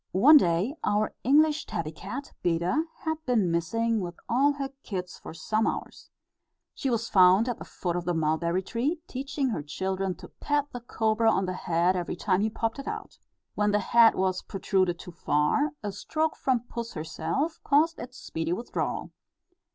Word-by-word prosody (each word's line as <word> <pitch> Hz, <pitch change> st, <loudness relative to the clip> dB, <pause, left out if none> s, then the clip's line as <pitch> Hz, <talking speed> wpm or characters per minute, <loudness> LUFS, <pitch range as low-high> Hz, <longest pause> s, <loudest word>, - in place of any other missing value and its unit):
One 295 Hz, +10 st, +9 dB
day 180 Hz, -, +2 dB
our 210 Hz, +1 st, +1 dB
English 300 Hz, +4 st, +3 dB
tabby 160 Hz, -3 st, -3 dB
cat, 225 Hz, -, -7 dB
Beda, 175 Hz, -, +1 dB, 0.2 s
had 315 Hz, -1 st, -3 dB
been 215 Hz, -8 st, +2 dB
missing 225 Hz, +7 st, 0 dB
with 175 Hz, -3 st, -5 dB
all 275 Hz, +5 st, +3 dB
her 275 Hz, -1 st, -4 dB
kits 180 Hz, -3 st, -5 dB
for -, -, -9 dB
some 215 Hz, +6 st, 0 dB
hours. -, -, -5 dB, 0.6 s
She 270 Hz, -, -2 dB
was 230 Hz, -1 st, 0 dB
found 190 Hz, +3 st, +5 dB
at 245 Hz, -, -2 dB
the -, -, -8 dB
foot 175 Hz, -2 st, -3 dB
of 175 Hz, -1 st, -3 dB
the 175 Hz, -1 st, 0 dB
mulberry 165 Hz, +3 st, 0 dB
tree, 260 Hz, -, -1 dB
teaching 270 Hz, 0 st, -2 dB
her 215 Hz, -, -2 dB
children 190 Hz, +5 st, -2 dB
to -, -, -12 dB
pat 290 Hz, -1 st, -1 dB
the 245 Hz, -, -6 dB
cobra 225 Hz, -1 st, +1 dB
on 195 Hz, -, +1 dB
the 185 Hz, -, -2 dB
head, 175 Hz, +1 st, +1 dB
every 175 Hz, -1 st, -2 dB
time 185 Hz, +1 st, +1 dB
he 220 Hz, -, +1 dB
popped 225 Hz, +4 st, -2 dB
it 275 Hz, -, -7 dB
out. -, -, -6 dB, 0.3 s
When 210 Hz, 0 st, +1 dB
the 205 Hz, -, +3 dB
head 230 Hz, +3 st, +5 dB
was 185 Hz, -1 st, 0 dB
protruded 185 Hz, -2 st, 0 dB
too 180 Hz, -, -10 dB
far, 165 Hz, -, +1 dB
a 205 Hz, -, -2 dB
stroke 310 Hz, +10 st, -1 dB
from 255 Hz, -3 st, +1 dB
puss 235 Hz, -1 st, -6 dB
herself, 265 Hz, -, -2 dB
caused 310 Hz, +3 st, +3 dB
its 250 Hz, +2 st, -8 dB
speedy 165 Hz, +1 st, -3 dB
withdrawal. 235 Hz, +7 st, -3 dB
210 Hz, 180 wpm, -27 LUFS, 180-260 Hz, 0.6 s, One